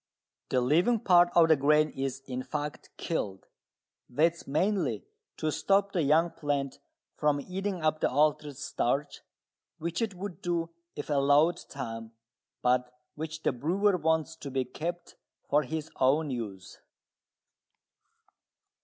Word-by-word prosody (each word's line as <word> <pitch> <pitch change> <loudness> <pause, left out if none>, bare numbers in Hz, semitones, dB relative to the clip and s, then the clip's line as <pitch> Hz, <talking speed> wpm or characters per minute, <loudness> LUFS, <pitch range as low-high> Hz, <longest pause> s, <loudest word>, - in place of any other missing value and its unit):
The 130 - +2
living 175 - +3
part 175 -2 +6
of 170 -1 +7
the 160 - +7
grain 150 +2 +3
is, 135 0 -4
in 130 -1 -4
fact, 145 +3 -5
killed. 100 - -3 0.6
That 160 +7 +3
is 170 - -14
mainly 185 +7 0 0.3
to 155 -1 -1
stop 200 +4 +2
the 180 - +1
young 160 +4 +3
plant 145 -4 -2 0.4
from 150 -1 +2
eating 185 +2 -4
up 155 0 +2
the - - +2
altered 145 0 +1
starch, 140 0 -1 0.6
which 170 +6 -3
it 215 -4 -1
would 185 0 -7
do 170 -1 -1 0.2
if 145 - -5
allowed 145 +4 +4
time, 115 -4 -6 0.5
but 125 0 +2 0.2
which 160 +1 -6
the - - +3
brewer 185 +10 +1
wants 160 -1 0
to 145 - -7
be 130 -1 -1
kept 175 +5 -6 0.3
for 145 +1 +4
his 160 +1 -5
own 145 +3 +3
use. 105 -7 -6
150 Hz, 135 wpm, -29 LUFS, 135-170 Hz, 0.6 s, of